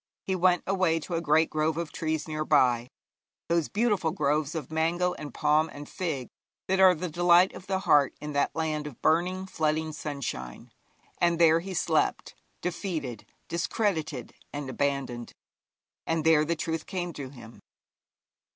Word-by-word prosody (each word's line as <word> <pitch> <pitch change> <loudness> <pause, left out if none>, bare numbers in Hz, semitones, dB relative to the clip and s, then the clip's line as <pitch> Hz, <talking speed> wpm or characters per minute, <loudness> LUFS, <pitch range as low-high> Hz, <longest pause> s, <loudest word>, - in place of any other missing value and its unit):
He 190 - 0
went 180 -1 +3
away 185 -4 +2
to 175 - -6
a 165 - 0
great 160 0 +3
grove 155 +1 0
of 170 -2 -3
trees 160 -1 -2
near 155 0 -2
by 125 -5 +3 0.6
those 170 -2 +1
beautiful 205 -6 +1
groves 150 +1 0
of 155 -3 -5
mango 170 +3 +1
and 150 -1 -8
palm 155 +1 +2
and 145 0 -9
fig 155 - -3 0.4
that 190 0 +1
are 185 -1 +7
the 180 +3 -3
delight 175 +2 +4
of 185 - -11
the 190 -1 0
heart 145 -7 +4
in 150 0 -6
that 145 - 0
land 155 -2 -1
of 140 - -10
burning, 180 +4 +2
flooding 155 -3 -1
sunshine 140 - -5 0.5
and 170 -1 +3
there 165 -1 +5
he 185 +2 -6
slept, - - 0 0.3
defeated, 165 - -4 0.2
discredited, 165 - -2 0.2
and 145 -2 -5
abandoned; 135 -4 -2 0.7
and 165 -1 0
there 160 -1 +5
the 170 +2 0
truth 160 0 -3
came 175 -2 -3
to 140 -3 -7
him. 120 -4 -13
160 Hz, 160 wpm, -28 LUFS, 150-175 Hz, 0.7 s, are